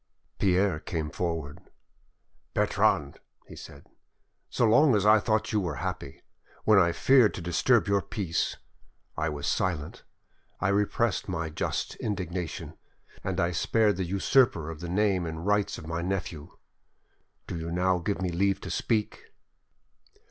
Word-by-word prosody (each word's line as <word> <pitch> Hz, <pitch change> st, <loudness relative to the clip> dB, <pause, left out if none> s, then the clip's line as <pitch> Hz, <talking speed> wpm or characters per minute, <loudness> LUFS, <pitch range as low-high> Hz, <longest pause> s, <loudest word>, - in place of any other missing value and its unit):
Pierre 95 Hz, -3 st, +2 dB
came 80 Hz, -2 st, -4 dB
forward. 80 Hz, -5 st, -3 dB, 1.0 s
"Bertrande," 70 Hz, -1 st, +1 dB, 0.3 s
he -, -, -12 dB
said, 70 Hz, -, -12 dB, 0.6 s
"so -, -, +1 dB
long 125 Hz, +4 st, +5 dB
as 105 Hz, -1 st, +1 dB
I 110 Hz, +1 st, +7 dB
thought 110 Hz, +1 st, 0 dB
you 105 Hz, -, +3 dB
were 85 Hz, -5 st, -3 dB
happy, 80 Hz, -3 st, -5 dB, 0.4 s
when 105 Hz, -2 st, +5 dB
I 85 Hz, -2 st, +4 dB
feared 125 Hz, +3 st, +4 dB
to -, -, -5 dB
disturb 105 Hz, +8 st, +2 dB
your 100 Hz, -1 st, +2 dB
peace, 90 Hz, -6 st, -2 dB, 0.6 s
I 80 Hz, +1 st, -1 dB
was 75 Hz, -1 st, -5 dB
silent, 85 Hz, -6 st, -2 dB, 0.6 s
I -, -, +1 dB
repressed 105 Hz, +2 st, 0 dB
my 80 Hz, -3 st, -3 dB
just -, -, -2 dB
indignation, 90 Hz, -5 st, -4 dB, 0.4 s
and -, -, -2 dB
I 85 Hz, -, +1 dB
spared 105 Hz, +4 st, +2 dB
the 95 Hz, -, -1 dB
usurper 95 Hz, -, +2 dB
of 80 Hz, -, -9 dB
the 85 Hz, 0 st, -6 dB
name 95 Hz, -2 st, +1 dB
and 80 Hz, +1 st, -6 dB
rights 105 Hz, 0 st, +1 dB
of -, -, -9 dB
my 80 Hz, +1 st, -3 dB
nephew. 90 Hz, -4 st, -4 dB, 0.9 s
Do -, -, -6 dB
you 80 Hz, +1 st, -5 dB
now 90 Hz, +1 st, +1 dB
give 95 Hz, +1 st, -2 dB
me 90 Hz, -, 0 dB
leave 95 Hz, +3 st, +1 dB
to -, -, -6 dB
speak?" 110 Hz, -2 st, -1 dB
90 Hz, 150 wpm, -28 LUFS, 80-105 Hz, 1.0 s, I